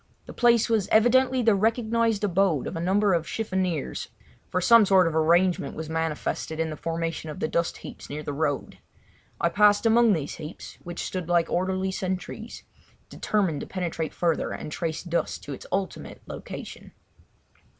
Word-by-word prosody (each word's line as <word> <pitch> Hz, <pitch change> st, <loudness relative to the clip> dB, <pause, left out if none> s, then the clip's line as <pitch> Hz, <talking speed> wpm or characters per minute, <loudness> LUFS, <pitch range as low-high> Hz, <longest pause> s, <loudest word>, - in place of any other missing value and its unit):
The -, -, -10 dB
place 235 Hz, -2 st, +4 dB
was 220 Hz, -5 st, +1 dB
evidently 255 Hz, +3 st, +4 dB
the 225 Hz, -1 st, +5 dB
recognised 225 Hz, +1 st, +1 dB
abode 190 Hz, -6 st, +2 dB
of -, -, -5 dB
a -, -, -3 dB
number 195 Hz, +3 st, +2 dB
of 165 Hz, -1 st, 0 dB
chiffoniers, 185 Hz, -8 st, -2 dB, 0.4 s
for 185 Hz, -, 0 dB
some 230 Hz, +5 st, +7 dB
sort 190 Hz, -2 st, +5 dB
of 165 Hz, -, 0 dB
arrangement 170 Hz, -1 st, +2 dB
was 160 Hz, 0 st, -6 dB
manifested 160 Hz, 0 st, -2 dB
in 160 Hz, -1 st, -1 dB
the -, -, -4 dB
formation 165 Hz, 0 st, -3 dB
of 150 Hz, -, -7 dB
the -, -, 0 dB
dust 170 Hz, +1 st, -1 dB
heaps -, -, -10 dB
near 150 Hz, +1 st, -5 dB
the 145 Hz, -, -4 dB
road. 145 Hz, -2 st, -2 dB, 0.6 s
I 170 Hz, -, +2 dB
passed 205 Hz, +3 st, +4 dB
amongst 225 Hz, -2 st, +5 dB
these 150 Hz, -3 st, -4 dB
heaps, 155 Hz, +2 st, -9 dB
which 175 Hz, -1 st, -6 dB
stood 180 Hz, -3 st, -4 dB
like 170 Hz, -1 st, +2 dB
orderly 185 Hz, +1 st, 0 dB
sentries, 185 Hz, -1 st, -5 dB, 0.5 s
determined 190 Hz, -9 st, -1 dB
to -, -, -6 dB
penetrate 170 Hz, -4 st, -3 dB
further 170 Hz, -2 st, 0 dB
and -, -, -6 dB
trace 160 Hz, 0 st, -3 dB
dust 170 Hz, -1 st, -2 dB
to 145 Hz, -, -6 dB
its -, -, -10 dB
ultimate 195 Hz, -1 st, -4 dB
location. -, -, -9 dB
180 Hz, 170 wpm, -26 LUFS, 160-205 Hz, 0.6 s, some